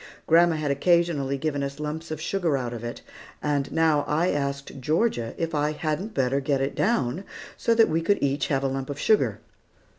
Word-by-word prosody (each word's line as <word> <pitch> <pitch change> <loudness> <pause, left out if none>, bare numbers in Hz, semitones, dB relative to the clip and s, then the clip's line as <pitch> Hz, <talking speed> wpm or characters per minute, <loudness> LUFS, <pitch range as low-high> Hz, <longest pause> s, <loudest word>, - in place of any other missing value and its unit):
Grandma 170 0 +5
had 150 -2 -1
occasionally 145 -3 +2
given 145 0 -2
us 140 +1 -4
lumps 155 +2 -4
of 155 -1 -4
sugar 165 -3 0
out 120 -2 -3
of 120 -1 -7
it; 120 0 -6 0.4
and 145 -2 0
I - - -19
now 160 -3 +3
asked 140 -4 -1
Georgia 150 - 0
if 165 -1 -2
I 150 0 +1
hadn't 155 +8 -3
better 135 0 +1
get 140 0 0
it 135 +1 -1
down, 185 - 0 0.3
so 230 - +1
that 225 -1 +6
we 160 +1 0
could 200 +5 +2
each 140 0 0
have 135 -1 0
a - - +2
lump 135 0 -3
of 145 - -4
sugar. 215 +7 +2
150 Hz, 200 wpm, -25 LUFS, 140-165 Hz, 0.4 s, that